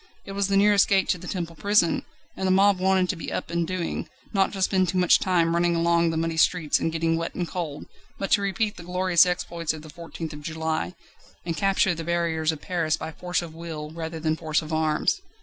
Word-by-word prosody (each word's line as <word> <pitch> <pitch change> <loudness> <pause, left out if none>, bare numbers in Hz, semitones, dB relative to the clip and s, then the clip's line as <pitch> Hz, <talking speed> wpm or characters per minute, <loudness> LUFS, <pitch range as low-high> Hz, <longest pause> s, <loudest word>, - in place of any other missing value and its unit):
It - - -8
was 200 0 0
the 195 -1 +2
nearest 205 0 +5
gate 195 -1 +2
to 180 - +1
the 180 - -9
Temple 170 -3 -4
Prison, 200 -1 +2 0.3
and 190 - -2
the - - +3
mob 195 0 +4
wanted 190 0 +3
to - - 0
be 165 - -6
up - - -4
and 170 -1 0
doing, 185 -2 -3 0.2
not 195 -2 +2
to 195 - -5
spend 185 -2 +2
too 185 - -1
much 180 -1 +5
time 170 -3 +2
running 170 0 +2
along 170 0 +3
the 165 - -2
muddy 165 0 -1
streets 160 -2 +3
and 165 - -1
getting 165 0 0
wet 165 0 -4
and 175 -2 -2
cold, 160 -5 -5 0.3
but 195 - -4
to 205 - +5
repeat 205 +2 -1
the 175 - -9
glorious 180 0 +3
exploits 170 -2 -2
of 155 -1 -9
the 155 - -11
14th 165 -1 -7
of 150 - -9
July, 160 +2 -3 0.5
and 165 -2 -2
capture 190 +2 +2
the 165 -1 -5
barriers 165 -1 0
of 155 - -8
Paris 165 -4 0
by 160 - -6
force 180 +2 -2
of 165 -2 -9
will 160 -2 -7
rather 160 0 -5
than 155 0 0
force 155 0 -1
of 155 +1 -6
arms. 155 -1 +1
170 Hz, 235 wpm, -25 LUFS, 160-185 Hz, 0.5 s, nearest